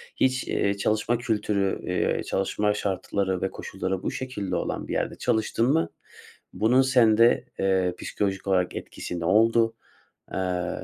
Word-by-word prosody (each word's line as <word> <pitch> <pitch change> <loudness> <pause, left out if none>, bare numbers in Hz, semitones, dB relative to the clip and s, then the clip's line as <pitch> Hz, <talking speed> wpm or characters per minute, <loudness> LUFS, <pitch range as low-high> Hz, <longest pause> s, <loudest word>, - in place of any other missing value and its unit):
Hiç, 130 -1 +1
eee, 100 0 0
çalışma 110 +3 +1
kültürü, 105 -4 0
eee, 90 - 0
çalışma 105 +2 0
şartları 95 -1 -1
ve 95 - -1
koşulları 95 -1 -4
bu - - -1
şekilde 105 -8 -4
olan - - -3
bir - - -4
yerde - - -1
çalıştın 110 +1 0
mı? 165 +1 +1 0.6
Buna 125 +5 +4
sende, 120 -3 +4
eee, 95 -2 +2
psikolojik 95 -1 -2
olarak 90 -2 +1
etkisi 90 - -6
ne 85 - -3
oldu? 115 +4 +3 0.6
Eee, 90 -1 -1
100 Hz, 140 wpm, -26 LUFS, 95-115 Hz, 0.6 s, Buna